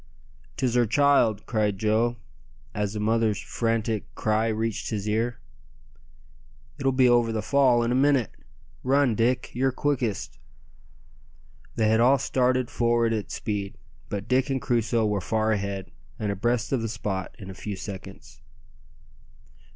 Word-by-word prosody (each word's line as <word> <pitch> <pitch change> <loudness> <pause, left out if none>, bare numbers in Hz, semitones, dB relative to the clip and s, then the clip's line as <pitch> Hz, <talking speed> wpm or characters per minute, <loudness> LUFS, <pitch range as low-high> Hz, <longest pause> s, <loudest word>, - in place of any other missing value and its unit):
"'Tis 125 -3 0
her 120 -2 +3
child," 120 -4 +3
cried 105 -3 0
Joe, 110 +3 +1 0.6
as 105 -1 -2
the 105 - -4
mother's 110 -1 +1
frantic 115 -2 -2
cry 110 +1 +1
reached 110 0 -2
his 105 -2 -3
ear. 115 +2 -1 1.4
"It'll 135 0 +2
be 130 -1 +4
over 120 -1 +3
the 110 -2 -2
fall 130 -2 +3
in 115 - 0
a - - +2
minute! 135 -3 +3 0.5
Run, 135 -1 +3
Dick, 120 +3 0
you're 130 +2 +1
quickest." 125 - -2 1.4
They 110 - +2
had 110 +1 +3
all 130 +4 +5
started 130 -1 +1
forward 120 -1 +2
at 105 -2 -3
speed, 100 -3 -4 0.3
but 100 -1 -4
Dick 130 +2 +2
and 135 -1 0
Crusoe 115 -2 +1
were 105 -2 0
far 110 +3 0
ahead, 100 -3 -3 0.3
and 105 -2 -2
abreast 115 +4 -1
of 130 -4 +1
the 115 - -2
spot 105 -3 -4
in 95 -1 -9
a - - -8
few 100 +2 -6
seconds. 95 0 -9
115 Hz, 145 wpm, -26 LUFS, 105-125 Hz, 1.4 s, all